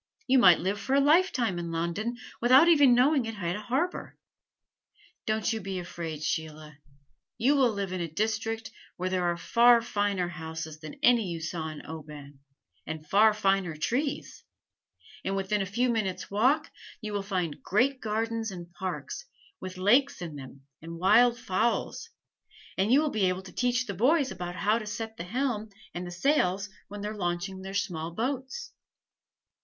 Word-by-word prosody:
You 265 0 +4
might 180 -7 +8
live 195 +3 -1
for 265 - 0
a - - +5
lifetime 280 - +3
in 170 -1 -4
London 170 +9 -2 0.2
without 260 +7 +7
ever 295 -5 +6
knowing 250 +1 +4
it 225 - -5
had 175 -3 -2
a 210 - -5
harbor. 275 +11 -2 1.1
Don't 220 +1 0
you 220 - -3
be 195 0 -4
afraid, 170 -3 -6
Sheila. 155 -1 -4 0.6
You 270 +6 +3
will 265 -3 +4
live 200 -3 -3
in 185 - -3
a 170 - -2
district 220 +5 -2 0.3
where 185 +1 -2
there 185 -1 0
are 175 0 0
far 235 +6 +5
finer 205 -5 -1
houses 160 -2 -7
than 155 -1 -9
any 240 -4 +5
you 170 -2 -4
saw 160 0 -4
in 155 -1 -9
Oban, 150 -3 -10 0.5
and 155 -1 -6
far 215 +5 +5
finer 195 -5 0
trees; 265 - -2 0.8
and 195 - -1
within 195 +1 0
a 195 - -2
few 240 +7 +1
minutes' 215 -7 -2
walk 265 +10 +2 0.3
you 215 -2 -6
will 205 - -1
find 180 -6 -3
great 260 +6 +1
gardens 225 +1 -2
and 175 -2 -9
parks, 190 - -5 0.3
with 185 0 -7
lakes 245 +9 +3
in 170 -4 -6
them 135 0 -11 0.2
and 165 +1 -8
wild 230 +7 +5
fowls, 235 - -1 0.7
and 195 +4 +1
you 275 +4 +6
will 305 -2 0
be 195 -4 +2
able 185 +1 -3
to 190 - -11
teach 250 0 +1
the 200 - -4
boys 270 - +2
about 175 -1 -5
how 210 +6 +1
to 215 - -8
set 220 +1 -5
the 170 - -5
helm 225 0 -2 0.2
and 175 0 -5
the - - -7
sails 195 - +1 0.2
when 205 +1 -8
they 205 - -3
are 215 - -5
launching 180 0 -3
their 190 +1 -7
small 165 -5 -2
boats." 260 - -4
200 Hz, 175 wpm, -28 LUFS, 175-240 Hz, 1.1 s, might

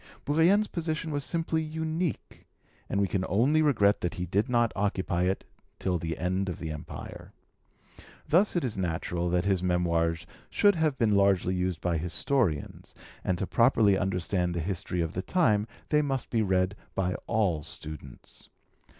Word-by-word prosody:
Bourrienne's 170 +9 +4
position 160 -1 -3
was 145 -1 -2
simply 165 0 -1
unique, 160 +1 -3 0.4
and 100 - 0
we 100 - +2
can 95 0 -1
only 130 - +3
regret 105 -9 +3
that 90 - -2
he 90 - -3
did 100 +8 0
not 120 -2 +2
occupy 95 -3 0
it 95 +1 -1 0.3
till 90 -2 -1
the 80 -1 -3
end 95 +2 -1
of 90 - -4
the 80 -2 -5
Empire. 75 -1 -8 0.9
Thus 185 +6 +3
it 175 - +1
is 115 -6 -2
natural 85 0 -2
that 90 +1 +1
his 95 -3 +2
Memoirs 85 -2 +1 0.2
should 205 0 +4
have 160 -5 0
been 110 -4 +2
largely 100 -2 +3
used 90 -2 -1
by 85 -2 0
historians, 90 - -1 0.3
and 90 - 0
to 95 - -2
properly 115 -3 +4
understand 90 -2 0
the - - -1
history 90 0 -2
of 80 -1 -2
the 90 - -2
time, 110 - +2 0.2
they 150 0 +4
must 135 -4 -2
be 115 - +2
read 95 -1 +1 0.2
by 90 -1 0
all 100 -9 +1
students. 75 -4 -9
100 Hz, 165 wpm, -28 LUFS, 90-135 Hz, 0.9 s, Bourrienne's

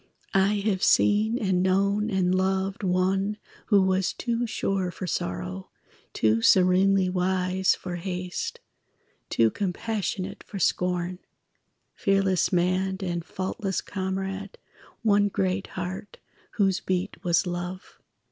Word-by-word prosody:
I 200 +1 +3
have 195 -4 +1
seen 215 +3 +3
and 190 -5 +1
known 200 +3 +2
and 185 -3 +1
loved 190 +1 0
One 190 +2 +1 0.3
who 200 -3 +5
was 190 0 +1
too 235 0 -2
sure 195 -4 -1
for 180 - -6
sorrow, 90 - -4 0.4
Too 110 +1 +2
serenely 185 +5 +4
wise 185 +1 +1
for 180 -1 -6
haste, 180 0 -4 0.7
Too 115 -1 +3
compassionate 200 0 -3
for 200 - -8
scorn, 180 -1 0 0.7
Fearless 195 -3 +1
man 185 +1 +1
and 175 -2 -2
faultless 190 +2 -3
comrade, 195 +1 -4 0.5
One 205 -2 +4
great 190 0 -1
heart 185 +2 -6 0.4
whose 195 -3 +2
beat 185 +1 -3
was 175 +2 +2
love. 175 +1 -5
190 Hz, 115 wpm, -26 LUFS, 180-195 Hz, 0.7 s, who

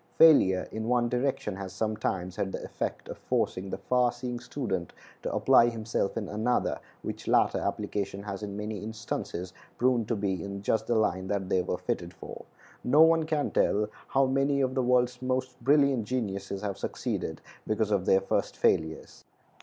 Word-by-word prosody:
Failure 95 - +6
in 110 0 -4
one 120 -1 +2
direction 125 -5 -1
has 95 -1 -6
sometimes 95 -4 -2
had 95 - -2
the - - -4
effect - - -4
of - - -8
forcing 95 +1 -1
the - - -3
far 125 -1 +2
seeing 120 0 -5
student 105 - -4 0.3
to - - -3
apply 120 - +5
himself 115 -3 -2
in 105 -3 -3
another, 110 +5 0 0.2
which - - -6
latter - - +3
application 100 -1 -3
has 100 -1 -5
in 100 -1 -5
many 105 0 -4
instances 105 -4 -5 0.2
proven 125 -2 +2
to 115 - -1
be 95 -4 -2
in 100 0 -6
just 110 - 0
the 120 - +1
line 95 -4 +1
that 95 -1 -2
they 95 - +3
were 90 - -2
fitted - - -3
for. - - -9 0.4
No 145 +5 +5
one 165 0 +4
can 150 -2 0
tell 105 +1 +2 0.2
how 135 0 +3
many 135 +1 +1
of 130 -1 +1
the 130 - +1
world's 125 0 +2
most 130 -1 -2
brilliant 140 -4 +4
geniuses 100 -5 -3
have 100 -3 -3
succeeded - - -3 0.3
because 110 0 0
of 100 -3 +1
their 95 - +5
first 95 - -1
failures. 80 0 0
110 Hz, 175 wpm, -29 LUFS, 100-125 Hz, 0.4 s, Failure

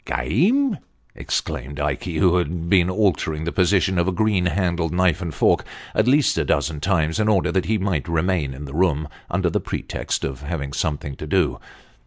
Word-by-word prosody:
" - - -42
Game! 200 - +1 0.2
" - - -39
exclaimed 70 +3 -3
Ikey, 75 +4 -2
who 90 +2 +4
had 85 0 -2
been 90 -3 +4
altering 90 -6 0
the 85 - -2
position 95 0 +2
of 85 - +1
a - - +2
green 100 -2 +1
handled 85 -3 0
knife 90 -1 +2
and 85 -2 -3
fork 70 - +2 0.3
at 110 - +2
least 140 +2 +3
a - - +2
dozen 75 +1 0
times, 80 0 0
in 110 - +2
order 100 -4 +2
that 95 -2 0
he 110 +1 +1
might 95 -6 -1
remain 85 -4 0
in 70 +2 -8
the 70 - -9
room 80 -3 +1 0.2
under - - 0
the - - +1
pretext - - -4
of 70 +1 -4
having 75 -2 -4
something 70 -2 -2
to - - -7
do. - - +1
85 Hz, 200 wpm, -22 LUFS, 75-95 Hz, 0.3 s, who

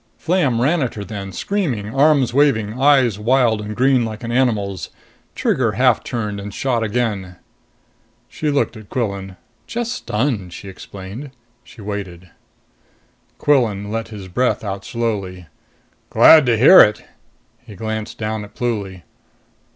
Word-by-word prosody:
Flam 165 -9 +1
ran 150 +7 +2
at 125 - -2
her 105 - -5
then, 100 -2 -7
screaming, 125 - -2
arms 135 -3 +3
waving, 125 -5 +1
eyes 130 -7 +4
wild 115 -1 +2
and 105 0 -6
green 130 0 +3
like 110 0 -6
an 115 - -4
animal's. 110 -7 0 0.5
Trigger 115 -5 0
half 125 +1 +2
turned 105 -5 -4
and 100 +1 -7
shot 120 +2 -1
again. 105 -5 -2 0.9
She 155 - -3
looked 140 -3 0
at 110 -2 -12
Quillan. 100 -6 -3 0.3
"Just 240 0 -3
stunned," 105 - -2
she 100 - -9
explained. 100 +8 -9 0.3
She 115 - -15
waited. 95 -4 -7 1.1
Quillan 110 -8 +1
let 115 0 -3
his 105 -4 -9
breath 125 +8 0
out 100 -1 -5
slowly. 100 -6 -3 0.6
"Glad 155 -5 +7
to 115 -2 +3
hear 135 - +8
it!" 105 0 +3 0.6
He 115 -4 -13
glanced 110 +2 -5
down 110 -1 -3
at 105 - -13
Pluly. 100 -8 -3
110 Hz, 140 wpm, -19 LUFS, 100-130 Hz, 1.1 s, hear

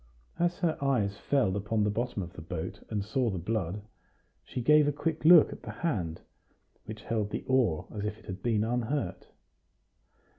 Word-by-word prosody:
As 175 0 +1
her 165 -2 0
eyes 110 -8 +1
fell 130 -10 +1
upon 105 +2 0
the 105 - +2
bottom 115 -2 -2
of 85 0 -9
the 80 - -9
boat, 80 0 -5
and 105 -2 -2
saw 120 +3 0
the 95 - -3
blood, 100 +1 -2 0.6
she - - -6
gave 150 +4 +5
a - - +3
quick 155 +2 -2
look 165 0 +8
at - - -12
the - - -9
hand, 90 - -2 0.6
which 110 0 -8
held 110 -3 -1
the - - -4
oar 125 -12 +2
as 105 - -3
if 105 +1 -3
it - - -19
had 95 -2 -6
been 110 -2 +1
unhurt. 120 -1 -2
110 Hz, 185 wpm, -30 LUFS, 100-135 Hz, 0.6 s, look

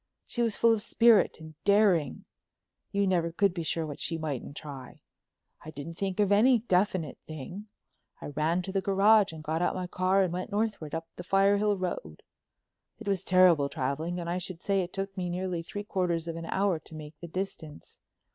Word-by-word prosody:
She 240 - -2
was 230 -3 +1
full 230 -1 +4
of 220 - -1
spirit 230 -5 +4
and 160 0 -11
daring; 200 -6 +3 0.7
you 200 0 +1
never 175 -3 +1
could 195 +2 +2
be 175 - -3
sure 165 0 -1
of 155 - -5
what 145 - -7
she 165 - -1
mightn't 145 -3 -5
try. 135 -4 -9 0.6
I 155 - -8
didn't 155 +2 -7
think 190 +3 -3
of 205 -1 +3
any 240 +5 +5
definite 185 - 0
thing. 160 +7 -8 0.5
I - - -7
ran 155 +5 0
to 190 - -5
the 195 0 0
garage 200 +1 +4
and 160 -1 -9
got 160 +2 -1
out 175 - +1
my 185 -1 -3
car 185 +2 +2
and 180 -2 -1
went 180 +4 -4
northward 205 -8 -2
up 165 0 -5
the 175 - -6
Firehill 200 +2 +3
Road. 175 - -5 0.7
It 225 - -11
was 195 -3 +1
terrible 175 -6 +5
traveling, 155 +8 -2
and 170 - -5
I 175 +2 -1
should 180 -1 -6
say 195 -1 +2
it 175 0 -5
took 195 0 -4
me 180 -2 -3
nearly 180 -1 -2
three 205 +4 -6
quarters 175 -4 -1
of 165 - -4
an 165 0 -6
hour 190 -4 +1
to 160 - -12
make 150 0 -10
the 170 - -8
distance. 165 -4 -6
180 Hz, 205 wpm, -29 LUFS, 160-200 Hz, 0.7 s, any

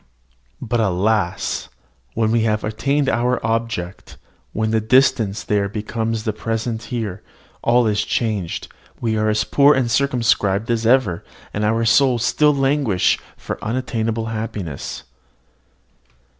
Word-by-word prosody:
But 120 -1 -1
alas! 100 -1 0 0.5
when 110 -1 +1
we 115 0 +2
have 105 -1 0
attained 135 +7 0
our 125 0 +1
object, 115 -5 -3 0.3
when 110 0 -1
the 110 0 +2
distant 115 -3 +2
there 100 -1 +1
becomes 110 +1 -3
the 110 - -1
present 115 +1 -3
here, 110 -5 -4 0.4
all 120 +1 +3
is 105 -1 +1
changed: 105 -7 -2 0.3
we 115 -2 -1
are 110 0 +1
as 110 0 +1
poor 145 +5 +4
and 125 -3 0
circumscribed 115 -5 +1
as 115 -1 0
ever, 115 -9 +2 0.3
and 105 - -2
our 115 +2 +1
souls 120 0 +3
still 150 -1 +3
languish 135 -8 +2 0.2
for - - -6
unattainable 115 -1 -2
happiness. 110 -9 -5
115 Hz, 130 wpm, -20 LUFS, 105-120 Hz, 0.5 s, poor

